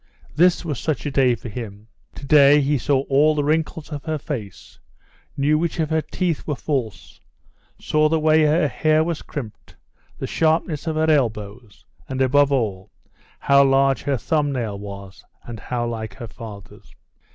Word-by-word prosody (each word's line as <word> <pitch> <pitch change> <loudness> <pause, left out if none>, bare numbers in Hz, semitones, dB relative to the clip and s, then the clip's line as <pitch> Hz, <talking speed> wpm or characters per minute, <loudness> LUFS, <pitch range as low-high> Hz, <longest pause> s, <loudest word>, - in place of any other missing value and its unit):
This 175 +3 +3
was 150 -6 -3
such 155 -4 -2
a 145 - -2
day 130 -3 +3
for 115 - -10
him. 105 -2 -8 0.3
To 140 - -9
day 145 0 +6
he 145 0 +1
saw 135 +1 +1
all 145 +3 +2
the 145 - 0
wrinkles 155 +1 -1
of 145 -1 -6
her 155 -1 -2
face, 120 - -8 0.6
knew 150 +2 +2
which 170 +1 -2
of 160 -1 -1
her 160 0 +2
teeth 165 +2 -3
were 150 - -1
false, 130 -7 -4 0.6
saw 155 0 +1
the 160 0 +1
way 155 0 +4
her 155 +1 +3
hair 155 +2 +2
was 165 -1 -3
crimped, 120 -8 -9 0.4
the - - -4
sharpness 160 -1 0
of 160 - -1
her 160 0 +1
elbows, 110 -5 -2 0.2
and, 130 0 -4
above 140 +2 +3
all, 105 -8 -1 0.5
how 140 0 +4
large 135 0 +3
her 140 -2 -1
thumb 145 +5 0
nail 115 -7 -3
was 100 -1 -10 0.2
and 115 -2 -8
how 120 +1 -3
like 110 -3 -5
her 115 +3 -8
father's. 110 -4 -12
140 Hz, 175 wpm, -21 LUFS, 115-155 Hz, 0.6 s, day